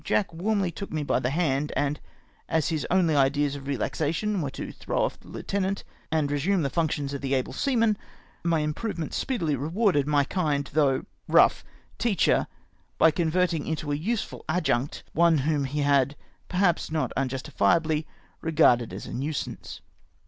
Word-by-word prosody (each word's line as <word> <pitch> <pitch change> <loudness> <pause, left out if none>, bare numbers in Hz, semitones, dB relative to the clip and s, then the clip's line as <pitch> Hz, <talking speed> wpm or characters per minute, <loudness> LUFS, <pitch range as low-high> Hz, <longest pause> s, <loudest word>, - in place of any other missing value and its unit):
Jack 195 -4 0
warmly 195 +1 0
took 200 +4 -7
me 155 -1 -1
by 140 - +1
the 125 - -1
hand, 150 -2 0
and 145 +1 0 0.5
as 160 -1 +1
his 160 -3 -2
only 175 -4 +3
ideas 140 +1 +2
of 140 -1 -8
relaxa 140 +3 -1
tion 205 +3 -1
were 145 - -2
to - - -6
throw - - -2
off - - -2
the - - -19
lieutenant 195 0 -2 0.3
and 155 -3 +1
resume 165 +5 +1
the 140 - -1
functions 150 -3 -1
of 140 - -4
the 135 0 0
able 130 - -1
seaman, 230 -6 +2 0.5
my 165 -2 +2
improvement 160 +2 -3
speedily 170 - 0
rewarded 155 - +1
my 145 -1 +3
kind 145 -3 -1
though 140 -3 +2 0.2
rough - - +5 0.4
teacher, 215 -8 +2 0.5
by 160 - +6
convert 175 +2 +1
ing 155 -3 -3
into 155 -2 -2
a - - +1
useful 200 +9 -3
adjunct 150 -6 0
one 170 -1 +4
whom 145 0 +1
he 145 +2 -2
had, 140 -1 +3 0.3
perhaps 180 -2 +1
not 155 -1 -1
unjustifiably, 150 +4 +1 0.3
regarded 150 -8 +3
as - - -7
a - - -7
nuisance. 145 +3 -4
155 Hz, 165 wpm, -26 LUFS, 140-175 Hz, 0.5 s, by